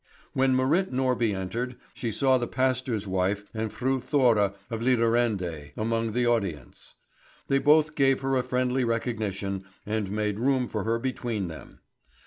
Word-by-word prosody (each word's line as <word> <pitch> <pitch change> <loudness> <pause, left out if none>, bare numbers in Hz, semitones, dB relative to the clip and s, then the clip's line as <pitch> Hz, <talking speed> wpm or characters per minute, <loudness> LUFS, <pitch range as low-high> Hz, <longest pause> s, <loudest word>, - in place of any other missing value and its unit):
When 130 0 +3
Marit 150 +9 +2
Norby 125 -5 +1
entered, 115 +7 -3 0.2
she 115 -3 -3
saw 130 +3 +3
the 120 - -2
pastor's 130 -4 0
wife 95 +2 0
and 110 -1 -3
Fru 130 +1 0
Thora 120 -7 +2 0.2
of 115 -1 -3
Lidarende 115 - +1
among 115 0 -1
the 120 +1 +1
audience. 95 - -2 0.5
They 135 - +3
both 150 +1 +4
gave 135 -3 +3
her 135 0 0
a 130 - +3
friendly 125 +1 0
recognition, 105 -5 -2 0.2
and 105 -2 -2
made 105 0 -1
room 130 0 +2
for 105 -3 -3
her 115 +1 +1
between 115 -6 -3
them. 80 - -11
115 Hz, 150 wpm, -27 LUFS, 105-130 Hz, 0.5 s, both